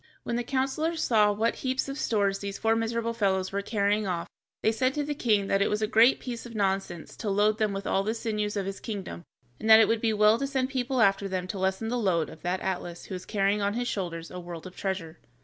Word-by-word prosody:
When 235 - -2
the 240 - -1
counselors 275 +6 -1
saw 210 -3 +4
what 220 +3 0
heaps 260 +1 -1
of 275 - -4
stores 200 -7 0
these 200 -1 -5
four 225 0 +2
miserable 230 +1 -1
fellows 190 -4 0
were 200 +1 -1
carrying 205 0 0
off, 175 -2 -2 0.4
they 220 - +4
said 255 +4 0
to 295 - 0
the 295 +1 -2
king 215 -8 +1
that 195 0 +1
it - - +3
was 210 +1 0
a - - +4
great 225 +4 +5
piece 240 -2 -6
of 235 -2 -10
nonsense 195 -4 -2
to 215 - -3
load 210 +2 +2
them 215 -2 +2
with 195 0 -4
all 195 - +1
the 215 +3 -2
sinews 210 -2 -2
of 195 - -1
his 195 0 -5
kingdom, 200 -6 -6 0.4
and 220 - -3
that 220 0 +10
it 225 - +6
would 225 -1 +1
be 225 - +2
well 215 +1 +4
to 275 - -1
send 265 -2 -1
people 255 -1 0
after 195 -1 +3
them 185 -1 -3
to 195 - -4
lessen 190 +4 -1
the 245 +1 -1
load 175 -7 +1
of 160 - -13
that 180 +1 -2
Atlas 175 -2 -4
who - - -8
was 180 - -7
carrying 200 0 +1
on 200 +1 0
his 245 0 -1
shoulders 170 -6 -4
a 180 - -6
world 175 -1 -8
of 185 - -10
treasure. 170 -5 -4
210 Hz, 255 wpm, -28 LUFS, 195-230 Hz, 0.4 s, that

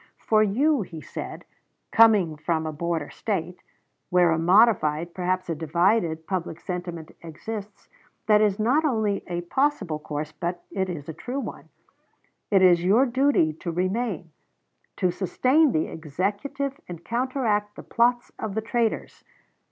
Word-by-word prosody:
"For 215 -1 +2
you," 260 +7 +2
he 170 -4 -7
said, - - -7 0.5
"coming 210 -8 +5
from 160 +1 -1
a 155 - -3
border 165 -1 -3
State, 180 -4 -3 0.5
where 180 -2 +4
a 160 - +1
modified, 170 -4 +3
perhaps 185 0 -1
a 170 - -1
divided, 165 +1 +1
public 175 -3 -3
sentiment 175 -3 -6
exists, 200 +6 -8 0.4
that 210 -1 +5
is 205 -2 +2
not 250 +8 +2
only 220 -8 0
a 175 -1 -3
possible 200 - 0
course, 150 0 -5
but 175 +2 -4
it 190 -1 -1
is 150 -5 -6
a 160 - -5
true 250 - -5
one; - - -7 0.8
it 195 -2 +4
is 175 -2 +5
your 215 +9 +4
duty 260 - +2
to 170 +2 -5
remain, 185 -1 -2 0.6
to 180 - +1
sustain 255 - +2
the 155 - +1
Executive 200 - -3
and 170 -1 -9
counteract 235 -4 -1
the - - -9
plots 240 +1 +1
of 210 -3 -4
the 220 - 0
traitors. 230 0 -2
185 Hz, 145 wpm, -25 LUFS, 170-225 Hz, 0.8 s, coming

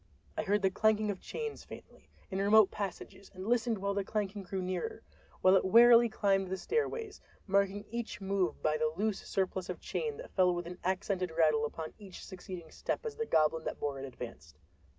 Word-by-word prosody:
I - - 0
heard 205 +1 +1
the 190 - +3
clanking 215 +1 +2
of 190 - -6
chains 450 -2 -5
faintly, - - -13 0.2
in 190 - -2
remote 205 +1 +6
passages, 195 0 -6
and 185 +1 -7
listened 230 0 +1
while 200 +1 -1
the 200 0 -1
clanking 205 0 -2
grew 190 0 -4
nearer—while 185 - -1
it 190 - +4
wearily 235 +3 +7
climbed 195 -3 +1
the 190 +1 -3
stairways, 450 - -2 0.2
marking 200 +1 +1
each 230 -5 -4
move 195 -2 -1
by 155 0 +2
the 155 0 +1
loose 215 0 0
surplus 190 -1 -2
of - - -4
chain 450 -2 -3
that - - -9
fell 180 -1 +3
with 175 0 -4
an 180 +1 -8
accented 185 0 -1
rattle 155 -2 +4
upon 155 +1 -7
each 195 -3 -10
succeeding 180 -3 -9
step - - -3
as 445 -1 -4
the 455 0 -3
goblin 160 +1 +2
that - - -4
bore 140 -2 -2
it 135 - -5
advanced. 115 - -9
195 Hz, 190 wpm, -32 LUFS, 180-215 Hz, 0.2 s, wearily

